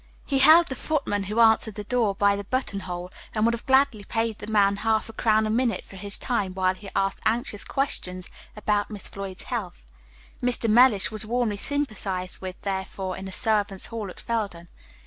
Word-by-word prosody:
He 275 - +1
held 315 +5 +8
the 265 - -5
footman 250 -10 -1
who 210 +4 -2
answered 220 -2 +5
the 210 - -5
door 220 -2 +1
by 200 0 +3
the 200 - -5
button 205 -2 -2
hole, 180 -1 -6 0.2
and 215 0 +2
would 235 - +3
have 235 +4 -6
gladly 265 -5 +3
paid 225 +1 -2
the 205 - -8
man 200 -2 +3
half 220 +1 0
a - - -9
crown 220 -1 +2
a 215 - -1
minute 235 0 +1
for - - -14
his 200 +2 -4
time 200 -7 -2
while 185 -1 +2
he 195 +1 -10
asked 195 0 0
anxious 230 -1 0
questions 185 -9 -2 0.3
about 210 -1 0
Miss 210 -3 -4
Floyd's 195 -2 -6
health. 205 - -5 0.6
Mr. 245 -2 +2
Mellish 225 -2 +5
was 215 0 -2
warmly 230 -2 -1
sympathized 200 -9 -3
with, 185 -1 -7
therefore, 190 -1 -3
in 190 - -7
the 190 - -6
servants' 205 -3 +1
hall 215 -4 -4
at - - -10
Felden. 200 -7 -3
210 Hz, 195 wpm, -25 LUFS, 195-235 Hz, 0.6 s, held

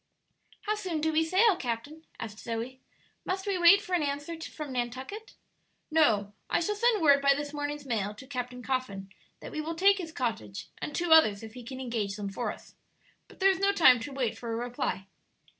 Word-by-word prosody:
"How 425 - -1
soon 370 -7 -3
do 315 +1 0
we 320 +1 +3
sail, 380 +5 +4
captain?" 285 +5 -5
asked 215 -1 -7
Zoe. 235 +3 -5 0.4
"Must 380 +1 -3
we 395 -3 0
wait 390 +4 +7
for 370 - -6
an 355 - +3
answer 290 +3 -3
from 300 -3 -7
Nantucket?" 260 - -5 0.6
"No; 220 -11 +3 0.2
I - - +2
shall 420 +5 0
send 430 -3 +2
word 280 -2 +6
by 280 0 +5
this 290 +1 -5
morning's 290 0 -4
mail, 210 -5 -2
to 240 - -11
Captain 250 -2 -5
Coffin, 205 -8 -3 0.3
that - - -8
we 310 - -3
will 325 +2 -4
take 395 +3 +4
his 330 -3 -5
cottage 220 - -4
and 295 - -5
two 345 -1 -1
others, 220 -11 +6
if 220 -1 -9
he 250 - -9
can 260 +2 -7
engage 225 -6 -2
them 205 -1 -4
for 235 +5 -2
us. - - -13 0.5
But - - -18
there 390 0 +5
is 380 - -2
no 395 +1 +3
time 255 -10 +6
to 255 +6 -6
wait 260 -5 -1
for 235 -1 -6
a - - -1
reply." 240 -5 -3
280 Hz, 210 wpm, -29 LUFS, 235-335 Hz, 0.6 s, wait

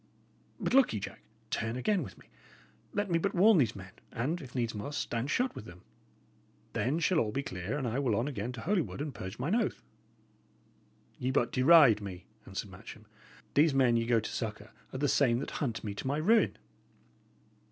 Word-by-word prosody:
But - - -2
look 270 - +5
ye, 105 - -1
Jack, - - -7 0.3
turn 110 +1 -1
again 190 +9 +1
with 140 - -8
me. - - -18 0.7
Let 205 -2 -2
me 165 - +3
but 195 +3 -1
warn 200 +1 +6
these 115 -6 +2
men, 95 -1 -10 0.2
and, 145 +9 -2
if 130 -3 -11
needs 120 -2 -1
must, 110 +8 -4
stand 120 +3 -2
shot 250 +9 +1
with - - -9
them; 85 -1 -13 0.9
then 135 +6 0
shall 170 +1 +2
all 110 -6 0
be 140 +5 -2
clear, 95 +5 -4
and 135 -4 -2
I 120 +4 -1
will 125 -6 +1
on 115 +6 0
again 120 -4 -3
to 120 - -7
Holywood 180 -4 -1
and 145 -1 -4
purge 95 -1 -7
mine 145 +10 -1
oath." 230 -2 0 1.4
"Ye 125 - -1
but 130 - +1
deride 135 -5 +6
me," 95 -3 -7 0.2
answered 95 +1 -5
Matcham. 110 +3 -11 0.5
"These 150 0 +4
men 130 -3 +4
ye 115 0 +1
go 120 -1 +4
to 110 - -5
succour 110 -1 -5 0.2
are - - -5
the 145 - 0
I - - +3
same 125 -4 +3
that 135 - -4
hunt 120 -6 -2
me 105 -2 -3
to 100 - -5
my 140 +2 0
ruin." 215 +9 +3
125 Hz, 205 wpm, -31 LUFS, 110-155 Hz, 1.4 s, warn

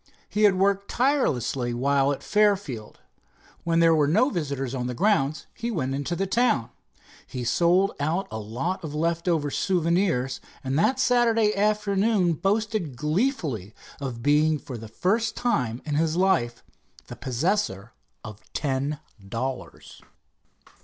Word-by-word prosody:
He 210 0 +2
had 200 -2 +5
worked 200 +1 +1
tirelessly 135 - 0
while 140 +2 +2
at 140 - -4
Fairfield. 200 - 0 0.6
When 165 0 +2
there 165 -1 +6
were 150 -2 +3
no 220 - +3
visitors 140 - -3
to 130 -2 -3
the 125 0 -3
grounds, 155 - +1
he 235 0 -4
went 140 - -2
into 145 +5 -2
the 195 - -1
town. 195 - +1 0.6
He 125 - -5
sold 175 - +3
out 160 +7 -1
a 110 - -4
lot 135 - -3
of 150 -2 -5
leftover 165 -2 0
souvenirs, 170 -7 0 0.2
and 135 0 -2
that 260 +9 +2
Saturday 230 -4 +3
afternoon 205 -2 +2
boasted 200 - -1
gleefully 150 - -1 0.2
of 125 -4 -5
being 150 +2 +3
for 135 -3 -8
the 110 -1 -8
first 205 - 0
time 125 - -1
in 150 - -3
his 160 +2 +1
life 180 -11 +1 0.4
the - - -9
possessor 125 - -1 0.3
of 110 -2 -9
ten 140 +1 -1 0.3
dollars. 130 +4 -5
160 Hz, 140 wpm, -25 LUFS, 130-200 Hz, 0.6 s, there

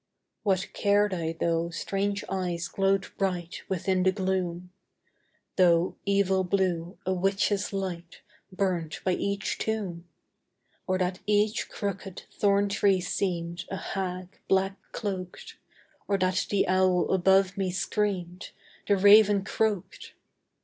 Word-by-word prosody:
What 190 -2 0
cared 205 0 +2
I 165 -2 -2
though 170 0 0
strange 200 +3 -2
eyes 180 -3 -2
glowed 195 0 +1
bright 180 -3 -2
Within 185 0 0
the 190 +1 +4
gloom! 185 -2 -2 0.9
Though, 175 -1 +4
evil 195 -1 +2
blue, 180 -2 -1
a 185 - +1
witch's 195 +2 0
light 180 -4 -5 0.3
Burnt 185 -5 -2
by 185 - +1
each 200 +2 -2
tomb! 190 -6 -3 0.8
Or 185 0 +1
that 185 0 -1
each 210 +1 +1
crooked 195 -2 -5
thorn 200 0 +2
tree 195 -1 +2
seemed 175 -2 -2
A 195 - -3
hag, 185 -1 -5
black 195 0 +2 0.2
cloaked! 185 -4 -5 0.5
Or 200 - +2
that 185 0 0
the 200 - +1
owl 185 -1 +2
above 190 +1 +3
me 195 -2 -1
screamed, 185 -1 -2 0.4
The 200 - +3
raven 205 0 +6
croaked! 210 -3 -2
190 Hz, 120 wpm, -27 LUFS, 180-200 Hz, 0.9 s, raven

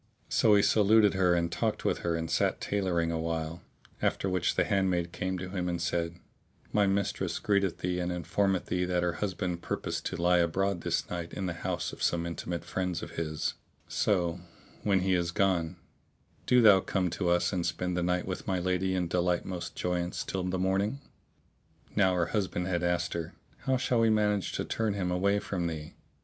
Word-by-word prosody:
So 105 -2 +5
he 100 - +5
saluted 105 0 +5
her 90 -2 +3
and 85 0 0
talked 85 - -1
with - - +1
her 85 -1 -1
and 80 0 -2
sat - - +1
tailoring 90 -5 0
awhile, 80 0 -2 0.4
after - - 0
which 90 -2 +1
the - - +3
handmaid 90 -3 +1
came 95 +1 -2
to 90 0 -5
him 90 -2 -2
and 85 -1 -2
said, 85 0 -1 0.6
"My 105 -1 +4
mistress 100 0 0
greeteth 100 -3 +1
thee 90 0 -2
and 90 0 -1
informeth 95 +2 0
thee 90 0 0
that 90 -1 0
her 90 -1 +1
husband 90 -3 -2
purposeth - - -3
to - - -3
lie 90 +1 +4
abroad 90 +2 +1
this - - -1
night 85 -1 -4
in 95 - -3
the 90 - -2
house 85 - -3
of - - -10
some 85 -1 +1
intimate 85 0 -4
friends 90 -2 -2
of - - -7
his; 75 -2 -2 0.3
so, 90 -4 +1 0.4
when 100 -3 +2
he 95 0 +2
is 85 -1 +1
gone, 90 -3 +1 0.7
do 125 -1 +5
thou 105 -3 +8
come 90 -2 -1
to 90 0 -1
us 90 +3 +2
and 90 -2 0
spend 90 +1 -1
the 90 - 0
night 90 +1 0
with 95 - -5
my 95 - +1
lady 95 +1 0
in 90 -2 0
delightsomest 90 +1 -1
joyance 90 0 -2
till 95 - -3
the 90 +1 -1
morning." 95 +7 0 1.0
Now 95 -2 +4
her 90 -1 +2
husband 95 -4 0
had 90 -2 0
asked 85 0 0
her, 85 -2 -4 0.3
"How 130 0 +3
shall 125 -1 +1
we 115 0 +4
manage 105 -2 +1
to - - -2
turn 110 -3 -1
him 90 -3 -1
away 100 +3 +2
from 90 -4 -2
thee?" 80 -2 -6
90 Hz, 195 wpm, -30 LUFS, 85-95 Hz, 1.0 s, thou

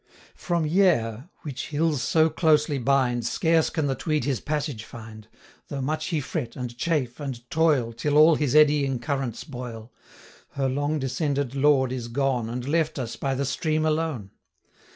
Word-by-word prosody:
From 170 -3 -1
Yair, 150 - +2
which 135 -4 -5
hills 155 -2 0
so 160 +2 +3
closely 150 -2 +2
bind, 125 -2 +1
Scarce 160 +6 +2
can 160 -3 -1
the 135 - +1
Tweed 155 +2 -1
his 135 -4 -1
passage 145 -6 -3
find, 110 -2 -11 0.4
Though 140 - -5
much 155 +4 -2
he 165 -4 0
fret, 130 -3 -4
and 125 -2 -5
chafe, 135 -3 -1
and 130 -4 -6
toil, 150 -8 +2
Till 145 +5 0
all 155 +2 +7
his 150 -3 0
eddying 145 -3 +4
currents 135 -3 -3
boil, 120 -5 -8 0.6
105 - - -17
Her 135 -1 +1
long 145 +3 -1
descended 140 -1 -1
lord 135 -2 +3
is 125 -2 -4
gone, 125 -2 -1
And 125 +2 -5
left 160 +1 0
us 120 -4 -4
by 135 -1 -2
the 140 +1 -1
stream 155 +3 0
alone. 155 -10 -1
140 Hz, 170 wpm, -25 LUFS, 125-155 Hz, 0.6 s, all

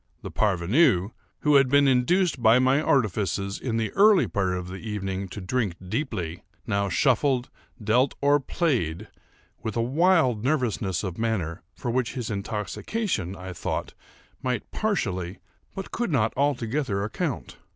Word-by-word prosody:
The - - -6
parvenu, 100 - +2 0.3
who 150 -1 +5
had 135 -2 +4
been 140 +1 +5
induced 135 +5 +2
by 115 +1 +6
my 130 +3 +3
artifices 100 - 0
in 115 -3 -2
the 110 -2 -1
early 200 - +5
part 95 -2 0
of 90 0 -5
the 95 +1 -6
evening, 100 -3 -4
to 95 - -8
drink 100 -1 -1
deeply, 95 - -3 0.2
now 100 -2 0
shuffled, 130 +2 +2 0.3
dealt, 125 +6 +2
or 145 +1 +4
played, 115 - -1 0.5
with 110 +1 -4
a - - +2
wild 140 - +3
nervousness 115 - 0
of 95 -1 -5
manner 95 -8 -1
for 120 - -3
which 125 +1 -1
his 120 -3 -3
intoxication, 105 - -3
I 95 0 -7
thought, - - -3 0.5
might 125 -1 -3
partially, 95 - -1 0.4
but 195 - -6
could 235 -5 -2
not 115 -6 +2
altogether 130 -6 0
account. 105 - -4
115 Hz, 145 wpm, -26 LUFS, 100-140 Hz, 0.5 s, by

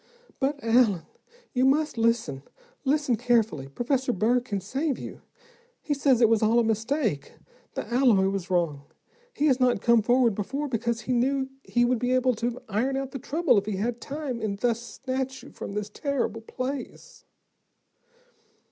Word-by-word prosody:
"But 280 +1 0
Allen, 225 -7 +3 0.5
you 250 - +2
must 295 +3 +2
listen, 230 - 0 0.4
listen 275 -3 +2
carefully. 225 - +1
Professor 250 - -1
Burr 235 +4 +2
can 220 -5 -4
save 270 - -2
you. - - -8 0.6
He 295 - -2
says 275 -3 +3
it 230 - +7
was 225 -1 +3
all 220 +2 +3
a 235 - +5
mistake, 225 - -1 0.4
the - - -3
alloy 240 -6 +3
was 195 -1 -4
wrong. 170 -6 0 0.5
He 295 - -1
has 270 -4 +3
not 250 -4 +3
come 235 +1 +4
forward 240 0 +3
before, 270 +9 -3
because 235 -2 -1
he 250 +3 -2
knew 265 +2 +1
he 240 0 +2
would 245 -1 +1
be 250 +1 0
able 255 0 +3
to 240 +2 -2
iron 240 +6 0
out 270 -1 -3
the 270 - -5
trouble 280 -3 +2
if 200 - -9
he 210 - -1
had 230 +5 -2
time, 275 -5 -4
and 205 -2 -2
thus 235 +1 0
snatch 265 +2 -4
you - - -12
from - - -7
this 210 0 -4
terrible 240 -4 -2
place." 255 +3 -6
240 Hz, 170 wpm, -26 LUFS, 220-265 Hz, 0.6 s, it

